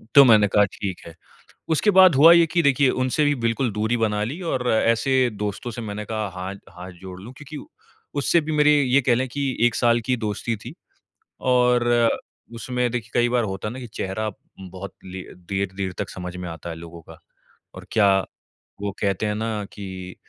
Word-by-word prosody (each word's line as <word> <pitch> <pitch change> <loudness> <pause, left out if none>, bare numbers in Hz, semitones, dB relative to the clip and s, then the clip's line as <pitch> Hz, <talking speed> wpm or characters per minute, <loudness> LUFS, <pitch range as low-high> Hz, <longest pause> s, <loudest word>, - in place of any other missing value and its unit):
तो 140 - +11
मैंने 110 -4 +6
कहा 105 +1 +4
ठीक 95 -3 -5
है, 85 - -10 0.6
उसके 210 +7 +2
बाद 185 -5 +8
हुआ 155 +5 +8
ये 170 -1 +6
कि 175 - +3
देखिए 140 -1 +4
उनसे 130 +4 +1
भी 145 0 +2
बिल्कुल 115 +2 +1
दूरी 110 +3 0
बना 105 -2 0
ली 135 +10 -4
और 125 -1 -1
ऐसे 115 +4 +2 0.3
दोस्तों 105 +3 -3
से 120 - -7
मैंने 105 -1 -5
कहा 110 0 -3
हा 90 +1 -5 0.3
हाथ 90 +1 -9
जोड़ 95 -1 -9
लूँ 120 +5 -10
क्योंकि 150 +1 -9 0.6
उससे 165 +4 +3
भी 155 +1 -4
मेरे 150 -1 +4
ये 135 +1 +3
कह 120 -2 +2
लें 130 +2 -1
कि 140 +3 -3 0.2
1 120 - -3
साल 120 -1 +3
की 125 - +3
दोस्ती 110 +1 -3
थी - - -8 0.8
और 125 -1 +3 0.7
उसमें 125 +1 -2
देखिए 115 -2 -4
कई 120 0 +3
बार 120 -1 +1
होता 95 +2 -5
है 105 - -5
ना 130 - -8
कि 125 - -7
चेहरा 110 0 -4
उम, 95 -2 -12
बहुत 95 0 -8
ले 95 0 -7
देर-देर 95 +1 -4
तक - - -3
समझ 90 0 -7
में 90 -1 -6
आता 85 +1 -7
है 80 - -6
लोगों 85 0 -10
का। - - -14 0.6
और - - -11
क्या 105 -3 +4 0.7
वो 100 0 -2
कहते 100 0 0
है 105 - 0
ना 110 -1 -3
कि 95 -2 -8
110 Hz, 200 wpm, -23 LUFS, 95-125 Hz, 0.8 s, तो